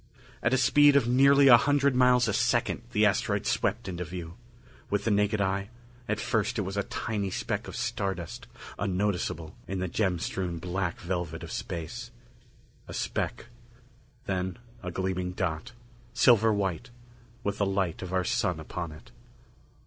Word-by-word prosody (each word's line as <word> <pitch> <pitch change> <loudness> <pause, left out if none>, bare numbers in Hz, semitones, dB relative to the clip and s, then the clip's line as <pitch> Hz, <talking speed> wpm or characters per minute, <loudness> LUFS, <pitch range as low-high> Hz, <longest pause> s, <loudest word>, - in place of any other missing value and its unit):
At 120 - +2
a 130 - +4
speed 140 +3 +6
of 135 -4 +4
nearly 140 +3 +6
a 120 -3 +10
hundred 140 +1 +2
miles 125 -1 +5
a - - 0
second 120 0 +1
the 110 -2 +3
asteroid 105 - +1
swept 105 +3 0
into 90 -1 -3
view. 85 -1 -7 0.6
With 100 - 0
the 115 - +1
naked 105 +1 +2
eye, 100 +1 0 0.4
at 110 0 0
first 110 0 0
it 105 - 0
was 95 +1 -5
a 100 - +1
tiny 100 -1 -3
speck 105 +3 -3
of - - -7
star 115 -5 -1
dust 85 -2 -8 0.3
unnoticeable 90 -4 -1
in 95 - -3
the 95 0 -1
gem 95 0 0
strewn 90 0 -3
black 90 +1 -3
velvet 85 -2 -3
of 80 - -7
space. 110 +6 -5 0.8
A - - -7
speck. - - -2 0.8
Then 95 -1 -2 0.2
a 90 - -4
gleaming 90 0 -2
dot, 90 +5 -3 0.4
silver 115 -3 +5
white, 100 +3 -1 0.5
with 100 0 -2
the 100 - +3
light 95 -4 -1
of 95 -1 -6
our 95 -1 +1
Sun - - 0
upon 85 -3 -5
it. 75 - -14
100 Hz, 165 wpm, -28 LUFS, 90-120 Hz, 0.8 s, a